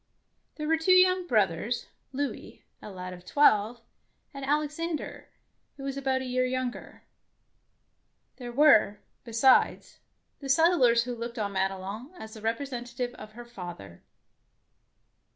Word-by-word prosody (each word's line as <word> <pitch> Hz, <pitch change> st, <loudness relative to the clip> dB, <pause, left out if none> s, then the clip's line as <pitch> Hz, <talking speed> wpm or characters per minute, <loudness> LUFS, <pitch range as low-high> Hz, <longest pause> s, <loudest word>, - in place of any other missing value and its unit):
There 300 Hz, -1 st, -5 dB
were 325 Hz, 0 st, +2 dB
two 370 Hz, +3 st, +4 dB
young 370 Hz, 0 st, +4 dB
brothers, 210 Hz, -, 0 dB
— -, -, -46 dB
Louis, 280 Hz, +1 st, -5 dB, 0.2 s
a -, -, -9 dB
lad 185 Hz, -2 st, -7 dB
of 180 Hz, 0 st, -12 dB
twelve, 225 Hz, 0 st, +3 dB, 0.5 s
and 275 Hz, -1 st, -8 dB
Alexander, 300 Hz, +3 st, -3 dB, 0.5 s
who 275 Hz, -, -9 dB
was 275 Hz, 0 st, -4 dB
about 265 Hz, -1 st, -1 dB
a -, -, -5 dB
year 255 Hz, 0 st, 0 dB
younger. 255 Hz, -1 st, -4 dB, 1.3 s
There 245 Hz, -2 st, -7 dB
were, 240 Hz, -7 st, +4 dB, 0.2 s
besides, 240 Hz, +3 st, +2 dB, 0.4 s
the 275 Hz, -, -8 dB
set 325 Hz, +5 st, +5 dB
tlers 240 Hz, -8 st, +4 dB
who 245 Hz, 0 st, -5 dB
looked 235 Hz, 0 st, -6 dB
on 205 Hz, -2 st, -2 dB
Madelon 195 Hz, -, -3 dB
as 220 Hz, -6 st, -10 dB
the 220 Hz, -, -11 dB
representative 245 Hz, +1 st, -3 dB
of 215 Hz, -3 st, -12 dB
her 240 Hz, +1 st, -10 dB
father. 175 Hz, -, -10 dB
245 Hz, 135 wpm, -28 LUFS, 215-280 Hz, 1.3 s, set